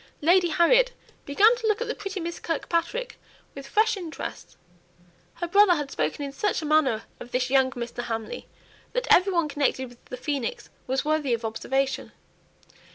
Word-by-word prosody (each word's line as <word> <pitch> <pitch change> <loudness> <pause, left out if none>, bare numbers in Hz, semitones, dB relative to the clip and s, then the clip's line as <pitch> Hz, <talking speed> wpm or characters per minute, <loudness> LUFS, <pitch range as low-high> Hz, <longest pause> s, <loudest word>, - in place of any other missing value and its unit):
Lady 350 +3 +4
Harriet 485 +10 +4 0.3
began 415 +12 +5
to 470 -2 -3
look 425 0 +2
at 480 - -3
the 480 - -1
pretty 395 -3 -5
Miss 340 0 -5
Kirkpatrick 340 +9 -2 0.3
with 275 -1 -9
fresh 435 +8 +2
interest; 345 -5 -7 0.8
her 345 - -3
brother 395 0 +5
had 295 -3 -4
spoken 155 - -2
in 280 - -5
such 370 +3 -1
a - - -3
manner 300 -7 +2 0.2
of 240 - -10
this 250 0 0
young 265 -1 +4
Mr. 240 0 -5
Hamley 225 -2 -5 0.5
that - - -1
every 380 +2 +5
one 340 -4 +1
connected 280 -3 -1
with 245 0 -19
the 250 - -7
phoenix 275 -2 -3 0.2
was 265 +2 -1
worthy 300 -5 +1
of 230 0 -7
observation. 270 +5 -2
310 Hz, 170 wpm, -26 LUFS, 260-390 Hz, 0.8 s, began